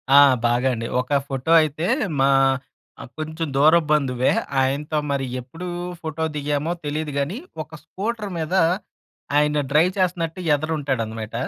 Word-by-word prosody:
ఆ! - - +9 0.3
బాగా 120 +2 +1
అండి. 115 0 -4
ఒక 140 +3 +1
ఫోటో 135 +3 -2
అయితే 155 +2 -2 0.3
మా 135 - +4 0.7
ఆహ్, - - -10
కొంచుం 155 +1 -3
దూరపు 155 +3 +5
బంధువే. 130 -4 +2 0.3
ఆయనతో 145 +3 -1
మరి 135 -1 -1 0.2
ఎప్పుదూ 165 +9 -9 0.3
ఫోటో 160 0 -4
దిగామో 145 +2 -1
తెలీదు 150 +1 -2
గానీ, 155 - -2 0.3
ఒక 155 - -26
స్కూటర్ 210 0 -4
మీదా 165 +3 +1 0.7
ఆయన 150 0 +3
డ్రైవ్ 160 +5 +4
చేస్తన్నట్టు 175 -2 -1 0.2
ఎదర 155 +2 -5
ఉంటాడనమాట. 115 -6 -3
150 Hz, 135 wpm, -22 LUFS, 135-165 Hz, 0.7 s, ఆ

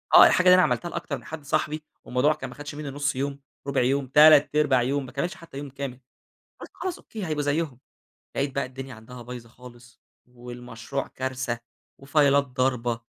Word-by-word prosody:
آه - - +11
الحاجة 185 - +3
دي 180 - +9
أنا 185 - +6
عملتها 175 -1 +1
لأكتر - - -4
من - - -14
حد 155 -2 -7
صاحبي، 150 +2 -1 0.2
والموضوع 130 +5 +2
كان - - -7
ما - - -11
خدش 145 0 -8
منّي 150 -1 -5
1/2 145 0 -1
يوم، 140 +1 -2 0.3
1/4 140 - +1
يوم، 135 +2 +1
3/4 150 -2 +6
يوم، 135 +2 0
ما 130 - -10
كملش 175 +7 -2
حتى 165 -7 -12
يوم 145 0 -6
كامل. 135 -2 -6 0.6
قُلت - - -9
خلاص 370 -2 -4
Okay - - -27 0.2
هيبقى 155 -3 -1
زيهم، 145 -3 -1 0.6
لقيت 135 -1 -1
بقى 140 -1 0
الدنيا 130 0 -8
عندها 120 +3 -11
بايظة 120 -1 -9
خالص، 120 0 -15 0.3
والمشروع 125 +1 -6
كارثة، 130 -2 -3 0.4
وفايلات 140 0 +4
ضاربة 125 -2 -1
135 Hz, 180 wpm, -26 LUFS, 125-145 Hz, 0.6 s, آه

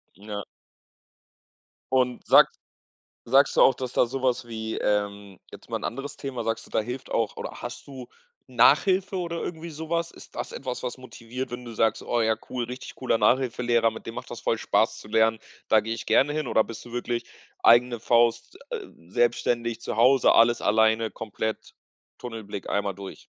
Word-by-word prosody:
Ja. 105 +1 -6 1.5
Und 125 -1 +1
sags - - +6 0.7
sagst 135 +4 +4
du - - +6
auch, 135 - +7
dass 130 -2 -5
da - - +3
so 130 +2 -5
was 125 -2 0
wie, 110 -1 -4
ähm 100 -2 -2
jetzt - - -13
mal - - -2
'n - - -11
anderes 135 +3 -4
Thema: 135 -3 -5
Sagst 115 0 -2
du, - - -18
da - - +2
hilft 125 +4 -6
auch 115 -2 0
oder - - -6
hast - - -7
du 130 -3 -9 0.4
Nachhilfe 185 +10 +3
oder 170 -2 -3
irgendwie 170 0 -6
so 160 +1 -8
was? 170 0 0
Ist - - -15
das - - -5
etwas, 130 -2 -5
was 125 0 -4
motiviert, 125 +1 -7
wenn 125 0 -6
du 115 - -8
sagst: 110 0 +1
„Oh 120 -1 0
ja, 110 0 +2
cool, 125 -1 -2
richtig 125 +2 -8
cooler 125 -3 0
Nachhilfelehrer, 120 -2 +2
mit 110 - -10
dem - - -7
macht - - -7
das - - -6
voll - - 0
Spaß - - +1
zu 105 - -13
lernen, 110 0 +3 0.3
da 110 - +5
gehe 110 +1 -3
ich 115 - -6
gerne 135 +6 +3
hin“, 155 -2 -2
oder 110 - +3
bist 110 -1 -9
du 120 - -11
wirklich 120 -1 -2 0.4
eigene 120 0 +5
Faust, 120 0 +2
s 470 - -3
äh, 390 - -11 0.2
selbstständig, 120 0 0
zu - - -4
Hause, 130 +3 +5
alles 120 +1 +5
alleine, 110 +1 +3
komplett, 110 0 -5 0.4
Tunnelblick, 110 -5 -7
einmal 100 -1 -1
durch? 100 0 -10
120 Hz, 190 wpm, -26 LUFS, 110-130 Hz, 1.5 s, auch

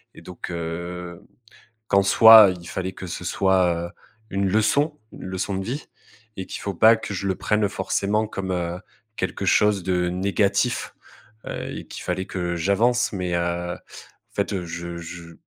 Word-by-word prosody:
Et - - -12
donc, 90 0 -8
heu, 85 +1 -5 0.7
qu'en 100 0 +4
soi, 110 0 +9
il 85 - -13
fallait 95 +1 -4
que 95 - -8
ce 90 +1 -6
soit, 90 -2 +2
heu, - - -15 0.4
une 100 0 0
leçon, 140 - +2
une - - -10
leçon 95 +1 -3
de 95 - -3
vie 130 +8 -5 0.5
et 95 - -4
qu'il - - -7
faut 100 - -2
pas 110 +5 +6
que 110 - -6
je 100 +1 -3
le 95 - +1
prenne 105 +3 +1
forcément 100 +3 -1
comme, 100 -3 -5
heu, 90 -1 -2 0.4
quelque - - -3
chose 105 -3 +3
de 90 -1 0
négatif. 100 +2 0 0.5
Heu, - - -5
qu'il - - -9
fallait 95 +1 -2
que 90 -2 -3
j'avance. 115 +8 +2
Mais, 90 -2 -2
heu, 85 0 -1
en - - -8 0.6
fait, 95 -3 -1
je 85 0 -6
je 85 0 -9
95 Hz, 165 wpm, -23 LUFS, 85-100 Hz, 0.7 s, soi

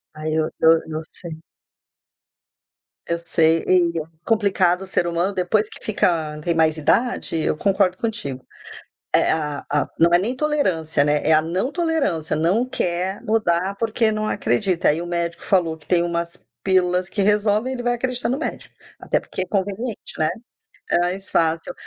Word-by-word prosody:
Aí 155 0 -3
o 155 - +2 0.2
eu 160 - +7 0.2
eu 155 0 -3
sei. 165 -2 -7 1.6
Eu 170 0 -1
sei, 165 -1 +2
e 180 -2 +4 0.3
complicado 195 -5 +2
o 190 - -9
ser 180 - 0
humano, 170 +4 0
depois 195 +3 +1
que - - -11
fica 160 -7 0
tem 170 +2 0
mais 160 -1 +3
idade, 230 +8 +1
eu 150 - 0
concordo 190 0 +1
contigo. 210 - -3 0.7
É, - - +3
a 150 -2 -2
a 145 0 +1
não 170 - +6
é 175 - +7
nem 230 +7 -2
tolerância, 185 - +1
né, 145 0 +1
é 160 - +4
a 155 - +5
não 180 - -2
tolerância, 295 - 0
não 185 +11 +1
quer 180 -2 -1
mudar, 195 -4 +1
porque 225 0 +1
não 215 0 -2
acredita. 195 -4 +1
Aí 155 +3 +1
o - - -6
médico 170 -1 -3
falou 170 -4 +1
que 155 - -19
tem 175 -2 +3
umas 170 0 -3 0.2
pílulas 180 -1 +2
que 200 - -2
resolvem, 210 +4 +2
ele 245 - -5
vai 245 0 +1
acreditar 250 0 -1
no 255 +3 0
médico, - - -6 0.2
até - - 0
porque - - -5
é - - 0
conveniente, 205 +4 -3
né. 155 0 +2 0.6
É - - +3
mais 185 +3 -2
fácil. 165 0 +1
180 Hz, 170 wpm, -22 LUFS, 165-210 Hz, 1.6 s, eu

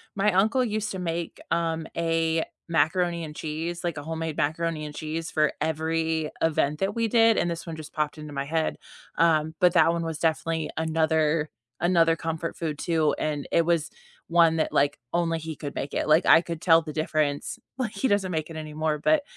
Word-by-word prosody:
My 205 +1 +2
uncle 220 +7 +3
used 215 -1 -2
to 190 - -5
make, 170 -1 -3
um, 165 -1 -1
a 165 -1 +1 0.2
macaroni 170 +2 +1
and 150 - -7
cheese, 165 +3 -4
like, 170 - -1
a 145 - -5
homemade 160 -1 -4
macaroni 160 0 -1
and 150 - -7
cheese 160 +2 -4
for 155 -1 +2
every 160 0 0
event 150 -2 +1
that 195 +1 0
we 230 0 0
did- 225 0 +4
and 175 - +1
this 170 0 -4
one 165 -2 -6
just 155 -1 -9
popped 150 0 -1
into 150 -1 -8
my 140 -1 -2
head- 160 +2 -1 0.4
um, 160 -1 +3
but 180 -1 +6
that 165 -1 +5
one 170 0 -2
was 160 -2 -4
definitely 160 0 0
another 160 -1 +1 0.3
another 165 -1 +3
comfort 165 +1 -4
food 155 -3 -3
too, 160 -2 +1
and 150 -2 -2
it 170 - +5
was 165 -2 +1 0.4
one 165 -1 +4
that, 155 - 0
like, 145 +1 +2
only 165 -1 +1
he 160 0 -6
could 145 0 -6
make 140 - -4
it. - - -1
Like, 155 +3 +5
I 165 - +7
could 170 -1 -6
tell 165 -2 +6
the 160 -1 -7
difference 155 +8 -1 0.2
like, 240 -4 -2
he 265 - 0
doesn't 200 -3 +1
make 155 0 -2
it 165 - -7
anymore, 155 0 -2
but 305 - +3
165 Hz, 200 wpm, -26 LUFS, 155-170 Hz, 0.4 s, I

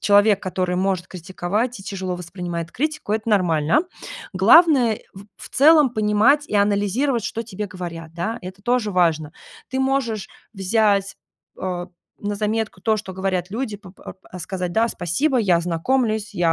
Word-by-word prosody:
человек, 205 0 +4
который 185 -1 -1
может 185 -1 0
критиковать 190 +6 -3
и - - -10
тяжело 190 -2 -4
воспринимает 175 -1 -6
критику- 305 -6 -2
это 220 +1 -2
нормально. 170 - +3 0.5
Главное 245 - +6
эу - - -11 0.2
в 195 +1 -12 0.2
в - - -9
целом 300 -1 +6
понимать 220 +7 +3
и - - -4
анализировать, 205 +5 +1
что 230 +1 -3
тебе 210 -2 -5
говорят, 170 -3 -7
да. 215 +7 -3
Это 185 +2 -9
тоже 240 -3 +1
важно. 160 -4 +1 0.4
Ты 260 - -3
можешь 265 -6 0 0.2
взять, 200 0 +1 0.4
о 180 -1 -3 0.4
на 205 0 -2
заметку 215 -2 -2
то, 220 -1 +2
что 190 -2 -7
говорят 190 -1 -2
люди, 220 0 -3
п 195 -4 -13
п - - -20
ар - - -8 0.2
а 185 - -8
сказать: 180 0 -4
"Да, 230 +1 +2
спасибо, 235 - 0
я 190 -7 +3
ознакомлюсь, 215 +5 0
я 170 -2 +2
200 Hz, 165 wpm, -22 LUFS, 180-225 Hz, 0.5 s, Главное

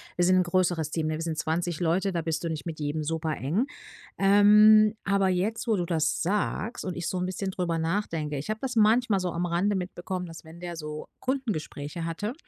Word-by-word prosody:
wir 175 - +2
sind 185 +1 +4
'n - - +5
größeres 175 -3 +1
Team, 160 0 -2
ne, 155 - -1
wir 155 - -4
sind 165 -2 -3
20 165 +1 -1
Leute, 180 +3 +1
da 170 -2 -2
bist 160 0 -2
du 165 - -1
nicht 155 -2 -4
mit 160 -2 -5
jedem 150 +1 -2
super 160 -1 -2
eng. 180 - 0 0.5
Ähm, 210 +2 +6
aber 195 0 +2
jetzt, 200 +6 -1
wo 225 - +3
du 180 -3 -1
das 160 -2 0
sagst 210 +5 -1
und 185 - -4
ich 175 -1 -3
so 185 - -2
'n 180 - -1
bisschen 190 +1 -3
drüber 175 -3 -1
nachdenke, 160 -4 -2
ich 145 - -7
habe 215 0 -2
das 255 -2 -2
manchmal 220 -1 +4
so 180 -1 -2
am 170 +1 -2
Rande 180 +4 +1
mitbekommen, 180 0 -4
dass 165 -2 -10
wenn 160 +2 -13
der 175 -1 -6
so 150 -1 -6
Kundengespräche 175 - -3
hatte 205 +7 -3
175 Hz, 220 wpm, -27 LUFS, 160-200 Hz, 0.5 s, Ähm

